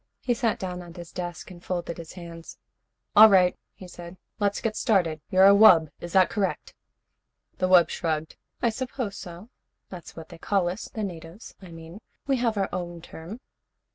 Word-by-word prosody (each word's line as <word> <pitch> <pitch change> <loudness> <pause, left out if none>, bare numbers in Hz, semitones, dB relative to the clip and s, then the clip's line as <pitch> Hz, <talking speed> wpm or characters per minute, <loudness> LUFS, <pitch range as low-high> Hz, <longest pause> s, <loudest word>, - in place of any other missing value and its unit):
He 245 - +1
sat 230 -2 0
down 180 -1 -5
at 175 -1 -12
his 170 -1 -9
desk 175 0 -6
and 175 -1 -13
folded 175 -2 -4
his 165 -1 -9
hands. 170 -2 -10 0.6
"All 215 +1 +10
right," 185 -3 +4 0.2
he 185 - -11
said. 175 0 -11 0.2
"Let's 205 -1 0
get 220 -1 -2
started. 170 -8 +1
You're 185 +1 +5
a 200 - +8
wub? 180 -7 +6
Is 175 - -8
that 190 -2 +5
correct?" 200 -3 -3 0.9
The 185 - +1
wub 175 -3 +6
shrugged. 160 -2 -3 0.3
"I 235 - +3
suppose 250 -3 -5
so. 175 +5 -10 0.4
That's 180 -3 -10
what 165 -1 -10
they - - -12
call 190 0 0
us, 185 +5 -6
the 220 - -5
natives, 170 +1 -8
I 190 - -11
mean. 165 +3 -11 0.3
We 275 -1 +1
have 230 -3 0
our 195 - 0
own 175 -2 -5
term." 175 +11 -10
180 Hz, 185 wpm, -26 LUFS, 170-205 Hz, 0.9 s, All